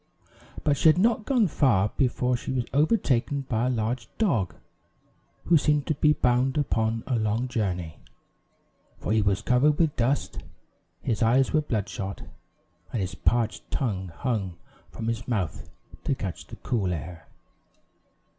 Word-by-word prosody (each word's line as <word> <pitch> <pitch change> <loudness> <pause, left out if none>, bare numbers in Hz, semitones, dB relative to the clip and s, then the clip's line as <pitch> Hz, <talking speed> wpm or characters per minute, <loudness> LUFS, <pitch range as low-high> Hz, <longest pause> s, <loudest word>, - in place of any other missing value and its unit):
But 145 -2 +2
she 160 - +6
had 155 - +4
not 220 +2 +2
gone 250 -5 +3
far 110 - +2
before 125 -1 +1
she 125 - -4
was 125 -2 -1
overtaken 145 - +2
by 125 -2 -1
a - - +1
large 115 0 -1
dog, 115 - +1 0.9
who 165 -3 +5
seemed 150 -1 +1
to 155 - +1
be 150 +1 +3
bound 130 0 +2
upon 115 -5 0
a 130 - -1
long 110 +3 0
journey; 90 -9 -3 1.0
for - - -4
he 110 0 +3
was 100 0 +1
covered 140 +5 +3
with 160 -4 +2
dust, 125 +4 0 0.6
his 110 -3 -1
eyes 125 +4 +3
were 155 - +4
bloodshot, 105 -6 -4 0.7
and 120 - -2
his 95 0 -2
parched 115 +3 0
tongue 100 -8 -2
hung 95 -2 -3 0.3
from 115 - -7
his 115 0 -2
mouth 100 -9 -2 0.4
to 135 - +1
catch 95 -8 -6
the - - -9
cool 100 -7 -1
air. 85 0 -6
120 Hz, 150 wpm, -26 LUFS, 105-140 Hz, 1.0 s, she